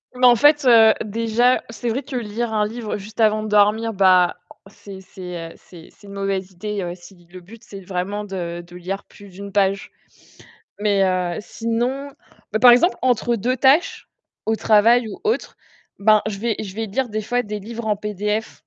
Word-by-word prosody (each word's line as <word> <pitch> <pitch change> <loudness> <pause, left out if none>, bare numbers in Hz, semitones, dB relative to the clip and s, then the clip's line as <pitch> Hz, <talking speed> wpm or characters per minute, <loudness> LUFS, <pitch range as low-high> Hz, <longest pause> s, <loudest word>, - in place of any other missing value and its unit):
Bah 250 0 +5
en 240 - +7
fait, 290 +3 +4
heu, 225 -3 +7
déjà, 230 +3 +1
c'est 230 +1 -4
vrai 260 +5 -2
que 265 -1 -8
lire 225 0 -3
un 210 -1 +1
livre 225 -2 -5
juste 210 +3 -12
avant 215 -1 +3
de - - -4
dormir, 210 +2 +2
bah 185 -2 +4 0.3
c'est 195 -1 -12
c'est, 180 -3 -8
heu, - - -13
c'est 170 -3 -15
c'est 205 - -19
une 200 - -10
mauvaise 195 -1 -3
idée, 210 +2 -5
heu 175 -1 -4
si 175 0 -17
le 185 - -11
but, 220 +6 -15
c'est 195 -3 -11
vraiment 190 +3 -4
de 175 -4 -5
de 175 - -15
lire 185 +3 -5
plus 200 -1 -16
d'une 200 +2 -10
page. 195 0 0 0.9
Mais 200 -2 +2
heu, 180 -2 0
sinon, 240 +6 -3 0.4
bah 215 - 0
par 245 -1 +8
exemple, 305 +10 +4
entre 240 -1 +1
2 250 +5 -1
tâches 280 +5 +2 0.4
au 220 - +1
travail 225 +2 +4
ou 205 - -9
autre, 445 +1 -2 0.4
ben, 215 +1 +4
je 200 -2 -5
vais 230 0 -1
je 195 -3 -8
vais 225 0 -3
lire 240 +4 -2
des 215 0 -3
fois 245 +3 -1
des 210 0 -5
livres 225 +2 -7
en 210 - +1
PDF. 210 +1 -4
210 Hz, 195 wpm, -21 LUFS, 195-230 Hz, 0.9 s, par